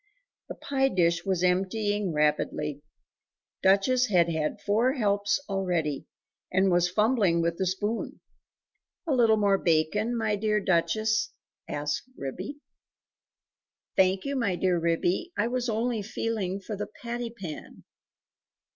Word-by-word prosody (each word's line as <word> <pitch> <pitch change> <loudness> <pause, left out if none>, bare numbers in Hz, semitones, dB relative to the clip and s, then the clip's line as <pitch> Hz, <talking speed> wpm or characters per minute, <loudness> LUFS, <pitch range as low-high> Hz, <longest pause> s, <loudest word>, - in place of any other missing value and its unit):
The - - -5
pie 270 -1 0
dish 170 -5 +1
was 185 -2 0
emptying 195 +2 +1
rapidly! 150 -1 0 0.8
Duchess 200 +7 +3
had 175 -4 +3
had 160 +5 -2
four 220 +6 +2
helps 205 -4 +1
already, 175 -7 -1 0.4
and 190 0 +3
was 175 0 +3
fumbling 210 -3 +2
with 170 0 -1
the 190 - +1
spoon. 205 +5 -2 0.9
"A 315 - 0
little 230 -4 +4
more 200 -2 +3
bacon, 185 +9 +1
my 215 -2 0
dear 210 +1 +1
Duchess?" 215 +4 +1 0.4
said 145 0 -4 0.3
Ribby. 185 - -6 1.4
"Thank 190 0 +3
you, 280 0 -2
my 230 -8 0
dear 180 -1 +1
Ribby; 175 - 0
I 210 - +2
was 250 0 -1
only 225 0 0
feeling 205 -3 -3
for 210 +2 -6
the 210 +1 -4 0.2
patty 240 0 -3
pan." 190 -9 -9
200 Hz, 130 wpm, -27 LUFS, 175-225 Hz, 1.4 s, little